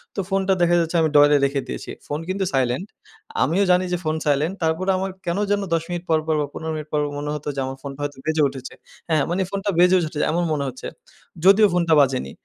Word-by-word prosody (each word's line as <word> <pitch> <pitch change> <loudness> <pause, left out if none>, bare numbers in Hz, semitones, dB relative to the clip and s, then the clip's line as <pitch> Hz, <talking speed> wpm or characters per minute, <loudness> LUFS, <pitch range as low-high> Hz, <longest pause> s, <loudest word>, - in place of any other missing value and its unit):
তো - - -3
ফোনটা 195 0 +1
দেখা 175 0 +4
যাচ্ছে 165 +1 -1
আমি 160 - +2
ড্রয়ারে 145 0 +6
রেখে 140 0 -1
দিয়েছি। - - -6 0.2
ফোন 145 +1 -3
কিন্তু 190 +1 -1
সাইলেন্ট, 130 +8 0 0.6
আমিও 170 +9 +2
জানি 180 +1 +3
যে - - +1
ফোন 155 0 -1
সাইলেন্ট 150 +5 +1
তারপরে 165 +4 0
আমার 190 +1 -2 0.2
কেন 170 +2 -1
যেনো 205 -1 +1
১০ 165 -1 +1
মিনিট 175 0 -4
পরপর 160 0 +1
বা - - 0
১৫ 160 0 -5
মিনিট 155 0 -6
পর 150 - +2 0.2
মনে 145 0 -4
হতো 150 - -7
যে - - -3
আমার 135 0 -6
ফোনটা 140 0 -8
হয়তো 145 -2 -4
বেজে 160 -1 +1
উঠেছে। 130 -1 -8 0.4
হ্যাঁ, 155 -3 +2
মানে 185 +2 0
ফোনটা 200 +1 -3
বেজেও 180 +1 +6
উঠেছে 155 -2 -4
এমন 175 +2 0
মনে 140 -2 -1
হচ্ছে, 130 0 -7 0.6
যদিও 205 +2 +7
ফোনটা 170 -2 +2
বাজেনি। 130 - 0
160 Hz, 220 wpm, -22 LUFS, 145-180 Hz, 0.6 s, যদিও